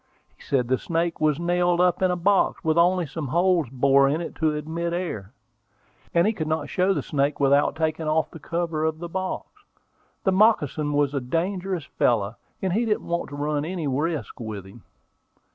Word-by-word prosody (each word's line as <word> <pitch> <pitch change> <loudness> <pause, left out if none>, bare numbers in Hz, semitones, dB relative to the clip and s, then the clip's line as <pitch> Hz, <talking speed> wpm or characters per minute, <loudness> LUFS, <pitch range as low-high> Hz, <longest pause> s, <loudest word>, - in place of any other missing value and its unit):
He - - -23
said 130 -4 0
the 130 +1 +1
snake 165 0 -2
was 155 -1 +2
nailed 175 0 +1
up 180 0 +3
in 185 - +3
a 180 - +1
box, 195 +3 +2
with 160 -2 +2
only 175 +1 +3
some 150 0 -5
holes 170 -1 +2
bored 135 +2 +4
in 155 - 0
it 170 - -5
to 155 -2 +1
admit 160 +3 -3
the 170 - -1
air; 110 - -5 0.8
and 170 +1 +3
he 220 - +2
could 160 -7 -4
not 155 +1 -1
show 185 +1 +2
the 150 -8 0
snake 145 0 0
without 140 +1 +3
taking 160 0 -1
off 155 +1 +1
the 165 - -10
cover 165 0 -2
of 160 0 0
the 175 +1 -6
box. 185 +2 -3 0.8
The 190 - +3
moccasin 160 - +2
was 145 -1 +1
a 140 - -1
dangerous 180 +5 -2
fellow, 110 -5 0 0.3
and 185 -2 0
he 225 +5 +2
didn't 215 -2 -1
want 170 0 -2
to 145 - -7
run 145 0 -1
any 170 0 -3
risks 145 - -2
with 110 -4 -6
him. 100 +4 -14
160 Hz, 200 wpm, -24 LUFS, 145-175 Hz, 0.8 s, bored